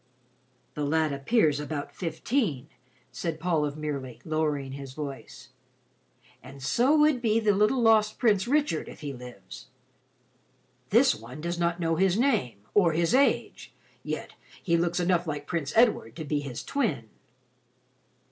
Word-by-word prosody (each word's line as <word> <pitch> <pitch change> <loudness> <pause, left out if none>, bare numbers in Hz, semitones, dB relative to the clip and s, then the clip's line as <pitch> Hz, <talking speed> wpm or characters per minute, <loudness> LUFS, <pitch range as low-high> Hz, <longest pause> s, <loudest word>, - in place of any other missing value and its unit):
"The 150 - -3
lad 155 0 +1
appears 145 - +2
about 150 -1 -5
fifteen," 165 - -2 0.4
said 165 -2 -4
Paul 165 -2 +1
of 145 0 -4
Merely, 140 -5 -5
lowering 150 -4 -1
his 135 -1 -8
voice, 135 -3 -8 0.9
"and 135 0 -12
so 245 - +3
would 300 -4 +4
be 225 -2 +2
the 215 -2 +3
little 210 +6 +2
lost 215 -1 +4
Prince 210 -5 +2
Richard, 285 - 0
if - - -12
he 145 -2 -5
lives. 125 -7 -11 1.2
This 250 +6 +5
one 125 +6 -10
does 170 +2 -3
not 170 0 0
know 165 -1 0
his 190 +1 +2
name, 220 - +1
or 175 -5 +4
his 165 +4 +1
age, 275 +2 +1 0.3
yet - - -5 0.3
he 170 -3 +2
looks 170 +1 0
enough 175 -1 +1
like 145 -2 -4
Prince 155 -4 -3
Edward 220 - +3
to 160 - -6
be 145 0 -1
his 135 -4 -6
twin." 185 - -1
160 Hz, 145 wpm, -27 LUFS, 140-210 Hz, 1.2 s, This